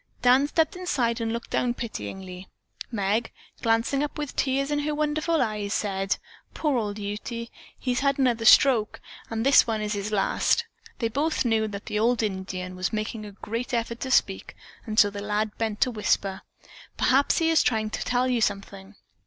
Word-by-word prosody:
Dan 255 +3 +5
stepped 320 +3 +1
inside 250 -11 -1
and 225 0 -1
looked 235 +1 -5
down 245 -1 0
pityingly. 185 - -7 0.4
Meg, 210 +1 0 0.3
glancing 230 +5 +1
up 295 - -4
with 295 -3 -5
tears 275 +1 0
in 295 - +1
her 300 +1 -1
wonderful 305 +1 +1
eyes, 210 -2 -2
said, 195 -2 -1 0.4
"Poor 300 -4 0
old 205 -2 -3
Ute. 205 +1 -5
He 235 -1 -5 0.4
has 245 - 0
had 275 -1 +1
another 240 -4 +1
stroke, 230 -4 +5 0.3
and 225 +1 -2
this 275 -2 +6
one 220 -1 -1
is 210 0 -2
his 205 +1 -3
last." 200 -2 +1 0.3
They 230 - 0
both 285 +5 0
knew 220 -2 +2
that 205 -1 -7
the 210 - -2
old 235 +1 +2
Indian 190 -2 -4
was 185 +2 -2
making 215 0 -4
a - - -9
great 230 +5 -4
effort 235 0 -2
to 260 - -4
speak, 195 -6 +1 0.3
and 215 -1 -4
the 205 -1 +4
lad 210 +1 -1
bent 220 -2 -2
to 255 - +3
whisper, 200 -3 0 0.6
"Perhaps 270 +3 +3
he 325 0 +2
is 325 - +5
trying 215 -2 0
to - - -3
tell 250 +1 +1
you 245 -2 +1
something." 200 -1 -3
225 Hz, 185 wpm, -26 LUFS, 205-255 Hz, 0.6 s, this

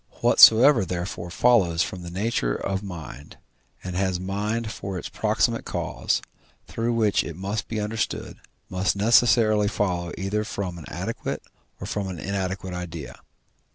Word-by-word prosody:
Whatsoever 120 +1 +7
therefore 90 0 -4
follows 90 -5 +3
from 90 - -6
the 85 - -7
nature 90 - -1
of 95 -1 -2
mind, 80 -8 -9 0.5
and 90 -1 -5
has 95 -1 0
mind 105 +4 -2
for 95 -3 -5
its - - -6
proximate - - 0
cause, - - -2 0.4
through 115 +1 -2
which 110 -3 +2
it 85 - -7
must 100 +4 -3
be 110 - -3
understood, 110 +2 -3 0.3
must 95 +1 0
necessarily 110 0 +4
follow 90 -5 -1
either 100 +3 -1
from 95 -4 -4
an 80 - -10
adequate - - -4 0.4
or - - -6
from 100 -2 -3
an 95 -2 -5
inadequate 95 0 -3
idea. 85 -3 -7
95 Hz, 145 wpm, -25 LUFS, 90-110 Hz, 0.5 s, Whatsoever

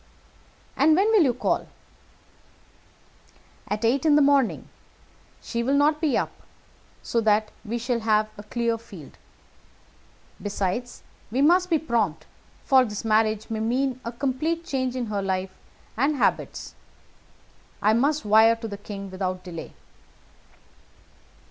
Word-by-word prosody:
"And 310 +3 +4
when 400 +5 +3
will 435 -4 +5
you 260 -7 +3
call?" 250 - -1 2.0
"At 210 +3 -2
eight 250 +4 +2
in 305 -2 +4
the 295 - +5
morning. 275 -4 +2 0.8
She 235 - -3
will 265 +4 +1
not 300 +2 +3
be 300 -6 +2
up, - - -1 0.7
so 230 - 0
that 215 0 +2
we 235 +1 -3
shall 240 0 -1
have 215 -1 +2
a 205 - -9
clear 230 +2 -2
field. 185 -10 -13 1.2
Besides, 205 +4 -3 0.3
we 255 +6 +1
must 360 +4 +4
be 330 - +3
prompt, 230 - -1 0.4
for 265 -2 +5
this 210 -2 -5
marriage 215 0 +1
may 220 - -2
mean 255 +3 -1
a 235 - -4
complete 285 +7 -2
change 260 -5 -2
in 250 -2 -2
her 210 -2 -2
life 190 -1 -2 0.4
and 275 +6 +1
habits. 270 - -1 1.1
I 215 - +3
must 280 +3 +1
wire 220 +2 +6
to 230 0 -7
the 200 -2 -7
king 200 -2 -8
without 185 -1 -3
delay." 170 -3 -8
235 Hz, 135 wpm, -25 LUFS, 210-275 Hz, 2.0 s, wire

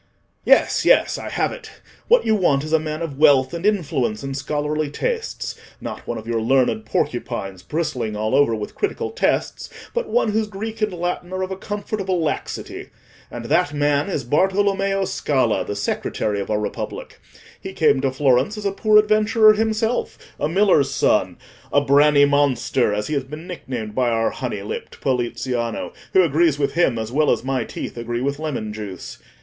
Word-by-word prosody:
Yes, - - +4
yes, - - +4
I - - -6
have - - 0
it. 475 -3 -9 0.4
What 485 +1 +4
you 220 - +3
want 160 -9 +2
is 155 +1 -5
a 160 - +5
man 155 +1 -4
of 145 -4 -6
wealth, 140 -2 +5
and 170 0 -5
influence, 140 - 0
and 135 0 -4
scholarly 150 +2 -2
tastes—not 460 - -5
one 120 - -3
of 110 - -8
your 115 -1 -1
learned 120 -2 +1
porcupines, 95 -3 -2
bristling 125 - -3
all 110 +1 -2
over 140 -5 +4
with 105 -1 -6
critical 410 - -2
tests, 475 - -1 0.2
but 485 0 -2
one 480 - +2
whose 220 0 0
Greek 220 +2 -6
and 215 -1 +1
Latin 175 0 -3
are 185 0 -2
of 185 - -4
a - - -2
comfortable 195 -2 -3
laxity. 160 -2 -4 0.4
And - - -7
that 145 - +1
man 145 +2 +1
is 150 -8 -2
Bartolommeo 195 +5 +1
Scala, 130 -6 0
the 105 - -5
secretary 100 0 -2
of - - -6
our 105 -1 +1
Republic. 105 - -5 0.4
He 190 - -6
came 150 -7 +2
to 135 - +1
Florence 135 - +2
as 210 - -6
a 200 - +1
poor 215 +2 +3
adventurer 215 +1 +5
himself—a 220 -7 -2
miller's 180 -6 +3
son—a 135 +1 0
'branny 145 +1 +5
monster,' 140 -4 +2
as 105 0 -1
he 155 - -3
has 140 -2 0
been 150 +5 -9
nicknamed 125 - -6
by 125 +1 +1
our 115 -1 +1
honey 115 -6 -4
lipped 105 - -7
Poliziano, 120 -2 -2 0.2
who 190 - +6
agrees 160 -1 +2
with 140 -1 0
him 145 -7 +2
as 110 0 -4
well 150 +3 +2
as - - +1
my 135 0 -1
teeth - - -7
agree 120 +1 -3
with 140 +2 -2
lemon 130 -9 -4
juice. 105 -3 -8
145 Hz, 175 wpm, -21 LUFS, 125-190 Hz, 0.4 s, who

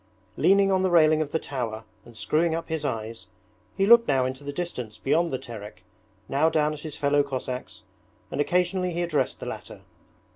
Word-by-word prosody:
Leaning 195 0 +4
on 190 -1 +2
the 190 - +2
railing 155 -2 +5
of 150 - -2
the 160 - 0
tower 120 -7 -4 0.2
and 120 -2 -14
screwing 155 +10 +1
up 165 0 -5
his 160 -1 -2
eyes, 115 -1 -4 0.5
he 195 - +3
looked 235 +2 +7
now 135 -2 +3
far 130 - +1
into 130 +2 -6
the 145 - -4
distance 125 -10 -5
beyond 155 +9 +1
the 130 - -1
Terek, 105 -7 -10 0.4
now 145 +4 +2
down 155 -1 +1
at 150 - -8
his 150 -1 -7
fellow 145 0 +3
Cossacks, 130 -2 -5 0.5
and - - 0
occasionally 180 +2 0
he 175 +1 -1
addressed 150 -6 -1
the - - -7
latter. - - -8
150 Hz, 195 wpm, -26 LUFS, 130-170 Hz, 0.5 s, looked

